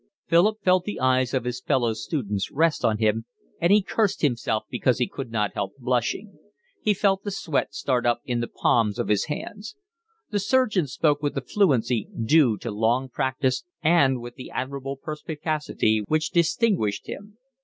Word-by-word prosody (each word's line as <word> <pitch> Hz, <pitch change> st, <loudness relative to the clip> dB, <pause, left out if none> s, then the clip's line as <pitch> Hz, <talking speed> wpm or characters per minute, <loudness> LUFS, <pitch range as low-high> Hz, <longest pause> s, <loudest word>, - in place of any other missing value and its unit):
Philip 205 Hz, +6 st, +3 dB
felt 185 Hz, -1 st, +3 dB
the 210 Hz, -, -4 dB
eyes 130 Hz, -1 st, +2 dB
of 130 Hz, -3 st, 0 dB
his 125 Hz, 0 st, -4 dB
fellow 120 Hz, -4 st, +1 dB
students 110 Hz, -, -3 dB
rest 160 Hz, +2 st, +1 dB
on 110 Hz, -1 st, +2 dB
him, 110 Hz, +1 st, +1 dB, 0.3 s
and 170 Hz, +2 st, +2 dB
he 205 Hz, -1 st, +5 dB
cursed 210 Hz, -2 st, 0 dB
himself 115 Hz, -5 st, 0 dB
because 125 Hz, -3 st, +1 dB
he 125 Hz, -, +1 dB
could 135 Hz, -4 st, -7 dB
not 105 Hz, -2 st, 0 dB
help 100 Hz, -, -4 dB
blushing. 130 Hz, -, -2 dB, 0.4 s
He 210 Hz, -1 st, +2 dB
felt 195 Hz, 0 st, +1 dB
the 205 Hz, -, -3 dB
sweat 170 Hz, -6 st, -2 dB
start 125 Hz, -3 st, 0 dB
up 120 Hz, 0 st, +1 dB
in 120 Hz, -2 st, -1 dB
the 120 Hz, -, -2 dB
palms 105 Hz, -4 st, +1 dB
of -, -, -2 dB
his 105 Hz, -2 st, +2 dB
hands. 205 Hz, +8 st, -6 dB, 0.6 s
The 205 Hz, -, +1 dB
surgeon 210 Hz, -, +2 dB
spoke 145 Hz, +2 st, +1 dB
with 145 Hz, -1 st, -1 dB
the 135 Hz, -, -1 dB
fluency 130 Hz, -, +1 dB
due 120 Hz, -1 st, +4 dB
to 115 Hz, -, -4 dB
long 115 Hz, +5 st, +1 dB
practice 130 Hz, 0 st, -1 dB, 0.2 s
and 145 Hz, -6 st, +4 dB
with 120 Hz, 0 st, -8 dB
the 130 Hz, -, -10 dB
admirable 135 Hz, +1 st, -4 dB
perspicacity 150 Hz, -6 st, -1 dB
which 155 Hz, 0 st, 0 dB
distinguished 170 Hz, -, +1 dB
him. 205 Hz, +1 st, -9 dB
135 Hz, 175 wpm, -25 LUFS, 120-170 Hz, 0.6 s, he